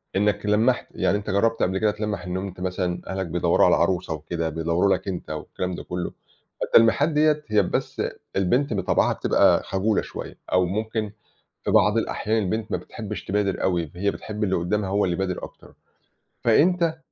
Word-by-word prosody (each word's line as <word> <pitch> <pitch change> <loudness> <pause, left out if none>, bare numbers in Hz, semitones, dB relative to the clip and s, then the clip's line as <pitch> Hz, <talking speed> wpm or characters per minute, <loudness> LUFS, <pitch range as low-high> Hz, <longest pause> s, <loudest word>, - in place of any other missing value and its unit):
إنّك 105 +1 +1
لمَّحت 110 +5 +2
يعني 100 - +1
أنت 105 - -6
جرّبت 115 +4 +2
قبل 95 +1 +1
كده 105 +2 +2
تلمَّح 105 -3 -3
إنّه 90 +1 -2
أنت 95 -2 -7
مثلًا 90 -1 -2
أهلك 95 0 -2
بيدوّروا 85 +1 +2
على - - +5
عروسة 85 -1 0
وكده 80 +2 -3
بيدوّروا 85 +5 +1
لك 95 - -9
أنت 90 -3 -4
والكلام 90 +4 -4
ده - - -7
كلّه، 90 0 -4 0.5
فالتلميحات 115 +7 +4
دِيَّة 150 -1 +2
هي 105 -1 +3
بس - - -2 0.3
البنت 120 +8 +1
بطَبعَها 95 -3 +2
بتبقى - - +3
خجولة 100 +3 0
شوية - - -8 0.2
أو 90 0 +4
ممكن 110 +3 -2 0.5
في - - -1
بعض - - +4
الأحيان 110 +1 0
البنت 110 +3 -2
ما - - +1
بتحبش 105 -4 -7
تبادر 100 0 0
أوي 85 -5 0
هي 100 +3 0
بتحب 105 +1 -5
اللي 95 -2 +1
قدّامها 95 +3 -1
هو 100 +1 +2
اللي 90 -2 0
يبادر 90 0 -3
أكتر، - - -11 0.7
فأنت 165 +7 +3
100 Hz, 175 wpm, -24 LUFS, 90-110 Hz, 0.7 s, على